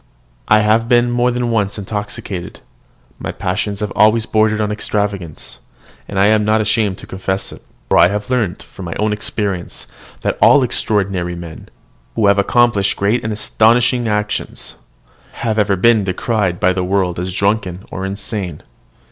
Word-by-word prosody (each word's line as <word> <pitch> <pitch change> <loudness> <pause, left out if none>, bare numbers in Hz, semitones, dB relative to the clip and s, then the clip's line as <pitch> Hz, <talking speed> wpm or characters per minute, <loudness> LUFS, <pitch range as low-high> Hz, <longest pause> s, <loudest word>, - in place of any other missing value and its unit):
I 105 0 +5
have 110 +2 +2
been 120 0 +3
more 120 +1 +2
than 120 -1 -1
once 105 -3 0
intoxicated, 105 -2 -5 0.6
my - - -4
passions 100 +3 -3
have 105 -1 -2
always 110 +1 +4
bordered 110 -1 +2
on 105 -1 0
extravagance: 100 -6 -3 0.5
I 100 0 +2
am 105 0 +4
not 110 +1 +2
ashamed 105 -2 +1
to - - -11
confess 95 +1 -3
it; - - -12 0.3
for - - +3
I 85 - +7
have 100 +2 -3
learned, 110 -7 -1
by 95 - -8
my 85 -1 -4
own 105 0 0
experience, 100 -4 -3 0.4
that - - -1
all 145 -2 +6
extraordinary 95 -7 0
men, 85 -2 -9 0.5
who 105 - +2
have 100 0 +4
accomplished 105 -2 +2
great 105 +5 +1
and 110 - -2
astonishing 115 +3 +2
actions, 105 -1 -3 0.6
have 110 -2 -1
ever 105 -1 +2
been 110 +3 +4
decried 95 -1 -1
by 90 +1 +3
the 90 0 -1
world 90 -2 0
as 90 +1 -3
drunken 100 -1 -1
or 95 - -5
insane. 95 -3 -4
105 Hz, 160 wpm, -17 LUFS, 95-110 Hz, 0.6 s, I